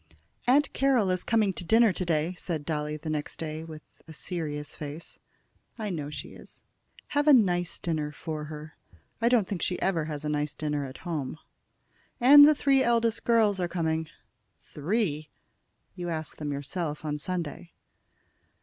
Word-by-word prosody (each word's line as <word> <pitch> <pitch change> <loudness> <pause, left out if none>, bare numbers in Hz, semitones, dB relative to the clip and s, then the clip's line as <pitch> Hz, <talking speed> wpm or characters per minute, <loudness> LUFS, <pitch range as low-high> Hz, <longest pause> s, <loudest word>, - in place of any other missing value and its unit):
"Aunt 275 +3 +4
Carroll 255 -8 +3
is 185 -1 -1
coming 215 -4 +2
to 180 - -5
dinner 220 +3 +5
to 185 - -2
day," 165 0 0
said 165 -4 -4
Dolly 150 -1 -2
the 155 +1 -9
next 150 -1 -3
day, 155 0 -4
with 155 -2 -10 0.2
a 160 - -10
serious 150 -3 -4
face. 150 +2 -8 0.6
"I 215 -3 -3
know 150 -4 -4
she 150 - -7
is. - - -14 0.5
Have 290 +1 +1
a 300 - +9
nice 180 -8 +3
dinner 155 -3 -2
for 155 -1 -5
her. 150 0 -9 0.5
I 235 - +4
don't 235 -6 +3
think 195 -4 -4
she 180 - -1
ever 170 -5 0
has 150 -1 -5
a - - -1
nice 150 0 -1
dinner 150 -2 -2
at 130 0 -9
home." 155 -4 -3 0.8
"And 290 +4 +10
the 305 - +5
three 275 -2 +3
eldest 235 -2 +1
girls 220 -4 +3
are 175 - 0
coming." 160 -2 -1 0.6
"Three!" 155 -2 -2 0.6
"You 175 -2 -5
asked 160 -1 -5
them 150 -1 -3
yourself 150 +2 -4
on 150 0 -2
Sunday." 170 0 -4
165 Hz, 165 wpm, -28 LUFS, 150-205 Hz, 0.8 s, And